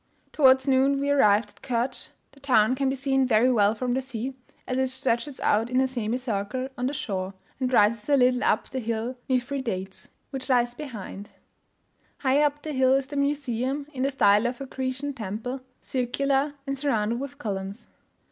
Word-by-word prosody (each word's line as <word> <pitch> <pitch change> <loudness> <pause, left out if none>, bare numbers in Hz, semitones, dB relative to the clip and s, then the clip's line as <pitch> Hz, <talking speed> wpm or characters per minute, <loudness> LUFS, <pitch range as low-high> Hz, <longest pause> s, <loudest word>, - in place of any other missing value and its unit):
Towards 265 -2 +5
noon 270 +1 +3
we 280 +1 0
arrived 215 -6 +4
at - - -25
Kertsch; 245 0 -2 0.2
the 280 - -20
town 250 -4 +3
can 270 0 0
be 265 - -1
seen 270 -1 +1
very 240 +2 +4
well 210 -2 +3
from 250 +2 -1
the 260 - 0
sea, 260 0 -5 0.3
as 255 0 -1
it 265 - +2
stretches 260 +1 -1
out 225 +3 +2
in 255 +1 +2
a 265 - +3
semi 240 -2 -2
circle 250 +1 -3
on 250 +1 -1
the - - -1
shore, 195 -7 -3 0.2
and 255 -1 0
rises 215 +1 +3
a 285 - +5
little 250 0 +3
up - - +2
the 265 - -4
hill 230 +1 -3
Mithridates, 245 -7 -2 0.2
which 265 0 -5
lies 240 -2 +3
behind. 220 -7 -8 0.9
Higher 280 +2 +3
up 295 0 -2
the 310 - -4
hill 260 -1 +4
is 270 0 +1
the 285 +2 -8
museum, 280 -1 -1
in 260 - -4
the 270 - +2
style 210 -4 +4
of 245 0 -4
a 275 - -5
Grecian 265 +2 -3
temple 230 +3 -5 0.2
circular, 275 +3 0
and 275 -1 -2
surrounded 235 -5 0
with 280 +1 -6
columns. 200 -4 -5
255 Hz, 185 wpm, -26 LUFS, 230-275 Hz, 0.9 s, Towards